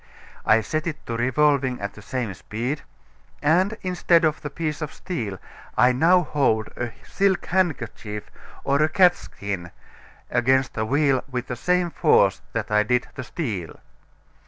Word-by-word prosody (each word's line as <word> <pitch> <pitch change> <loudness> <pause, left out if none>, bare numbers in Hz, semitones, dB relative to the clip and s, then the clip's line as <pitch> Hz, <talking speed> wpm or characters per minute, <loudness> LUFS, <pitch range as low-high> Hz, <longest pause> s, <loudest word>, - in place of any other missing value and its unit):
I 110 +1 +6
set 155 +9 -2
it 160 - -5
to 115 - -3
revolving 130 +1 +2
at 100 0 -4
the 105 - -12
same 115 -1 -3
speed, 120 +10 -4 0.6
and 185 +8 +2
instead 175 -2 +3
of 155 -1 0
the 150 - -4
piece 155 +1 -3
of 155 - -3
steel, 110 - -4 0.4
I 125 +3 +6
now 170 +8 +4
hold 135 -8 +1
a 120 -1 -3
silk 195 -2 +1
handkerchief 120 - -2 0.3
or 140 +1 +2
a 155 - +3
catskin 100 - +1 0.6
against 130 +2 +2
the 110 0 -2
wheel 140 0 +2
with 125 -1 -3
the 125 - -4
same 180 +6 +1
force 100 - +3
that 110 -1 -3
I 105 0 +4
did 125 +3 0
the 130 - -6
steel. 110 - -4
130 Hz, 155 wpm, -24 LUFS, 115-160 Hz, 0.6 s, I